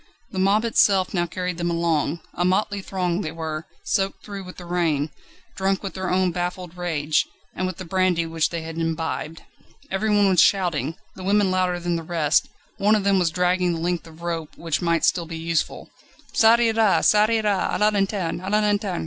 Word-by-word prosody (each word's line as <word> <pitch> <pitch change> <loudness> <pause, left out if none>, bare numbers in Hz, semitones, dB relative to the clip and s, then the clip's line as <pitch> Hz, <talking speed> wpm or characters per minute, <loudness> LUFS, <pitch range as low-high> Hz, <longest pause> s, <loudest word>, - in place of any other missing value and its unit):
The 190 - -3
mob 200 +4 +3
itself 195 -4 +3
now 175 -2 0
carried 180 0 -4
them 170 0 0
along. 165 -2 0
A 175 - -1
motley 200 +2 +1
throng 180 -1 -2
they 155 - -4
were, 160 -1 -5 0.2
soaked 195 0 -1
through 200 -2 -7
with 180 - -11
the 180 - -9
rain, 160 -4 0 0.4
drunk 195 +1 0
with 195 - -5
their 185 -1 -3
own 185 0 +2
baffled 180 0 -4
rage, 160 -4 0 0.3
and 185 - -2
with 185 - -5
the 185 - -7
brandy 180 -1 +1
which 165 -1 0
they 170 -1 -4
had 165 0 -6
imbibed. 165 -1 -3 0.5
Everyone 205 +1 +2
was 185 -4 +5
shouting; 165 -6 +2 0.2
the - - -10
women 200 0 +2
louder 185 -1 +1
than 175 -1 -1
the - - -4
rest; 160 -2 +1 0.3
one 210 +2 +4
of 210 - 0
them 200 -1 +3
was 175 -2 +2
dragging 180 +1 +1
the 165 - -3
length 175 0 -2
of 165 +1 -14
rope, 165 -2 -4
which 165 -1 -2
might 170 -1 +2
still 170 -2 +1
be 165 0 -6
useful. 165 0 -2 0.4
"_Ça 225 +1 +6
ira! 225 -3 +3
ça 210 +1 +5
ira! 215 -4 +1
A - - 0
la 210 0 +4
lanterne! 195 -4 -1
A 190 - -5
la 210 +1 +3
lanterne! 205 -3 0
180 Hz, 200 wpm, -23 LUFS, 165-195 Hz, 0.5 s, Ça